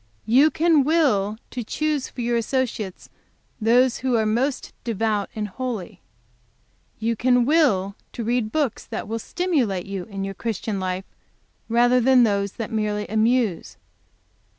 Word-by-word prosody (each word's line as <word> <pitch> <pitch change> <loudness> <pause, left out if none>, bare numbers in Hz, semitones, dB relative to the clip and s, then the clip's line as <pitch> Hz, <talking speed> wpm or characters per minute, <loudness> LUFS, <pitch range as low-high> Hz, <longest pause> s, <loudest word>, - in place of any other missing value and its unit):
"You 265 +7 +5
can 315 -2 +3
will 255 -10 +2
to 245 - -4
choose 300 +4 -1
for 250 - -7
your 240 0 0
associates 230 -5 -2 0.5
those 245 +3 +3
who 255 -1 0
are 220 - +1
most 250 +6 -1
devout 215 -3 -1
and 210 -1 -2
holy. 225 -3 -5 1.0
"You 230 +1 -1
can 245 +1 +3
will 235 - +2 0.2
to 235 - -4
read 235 -1 0
books 295 -7 -1
that - - -6
will 225 +1 -3
stimulate 255 - -1
you 195 -2 -5
in 195 -2 -6
your 195 0 -4
Christian 215 -1 -3
life, 185 0 -3 0.6
rather 245 +2 +4
than 255 0 +5
those 200 -3 +1
that 225 - -5
merely 210 -1 -1
amuse. 220 -3 +1
230 Hz, 145 wpm, -23 LUFS, 210-255 Hz, 1.0 s, You